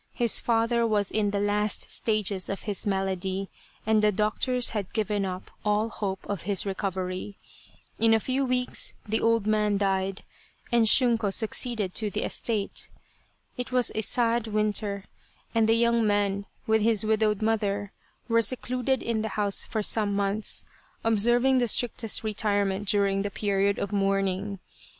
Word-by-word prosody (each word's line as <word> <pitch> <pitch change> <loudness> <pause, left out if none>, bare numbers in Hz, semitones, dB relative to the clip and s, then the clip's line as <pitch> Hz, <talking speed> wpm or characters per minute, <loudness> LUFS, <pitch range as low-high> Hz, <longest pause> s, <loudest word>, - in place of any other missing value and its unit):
His 235 -2 +3
father 230 0 +1
was 205 -2 0
in 210 -1 +1
the 200 0 -1
last 205 +1 -1
stages 210 -4 0
of 195 - -4
his 205 -1 -1
malady, 190 0 -2 0.3
and 220 0 +3
the 210 0 +4
doctors 220 +5 +1
had 205 -4 -4
given 210 -2 0
up 185 0 -6
all 210 +1 +1
hope 195 -4 -4
of 200 -5 -3
his 200 +1 +1
recovery. 190 0 -4 0.6
In 225 0 +4
a 225 - +5
few 260 +4 -1
weeks 250 -1 0
the 220 +1 0
old 230 -2 +2
man 210 -1 +1
died, 195 -1 -1 0.5
and 235 -2 +4
Shunko 230 -4 +3
succeeded 220 -2 0
to 215 -1 -1
the - - -3
estate. 215 -4 -2 0.7
It 250 +1 -4
was 250 -2 +2
a 220 - -1
sad 235 +1 +1
winter, 210 -2 -1 0.5
and 225 -1 +2
the 225 - +5
young 235 -1 +2
man 200 -1 0 0.2
with 220 0 +2
his 220 -1 +2
widowed 215 -1 +1
mother, 205 -2 -1 0.4
were 230 -1 +3
secluded 255 +3 0
in 230 -2 -1
the 220 - -3
house 205 -1 +1
for 215 -2 -3
some 205 -1 +2
months, 200 +1 0 0.4
observing 240 +4 +3
the 245 - +1
strictest 230 -1 +1
retirement 205 -2 0
during 195 -1 +2
the 205 - -2
period 200 0 0
of 200 - -3
mourning. 195 0 0
210 Hz, 155 wpm, -27 LUFS, 200-225 Hz, 0.7 s, a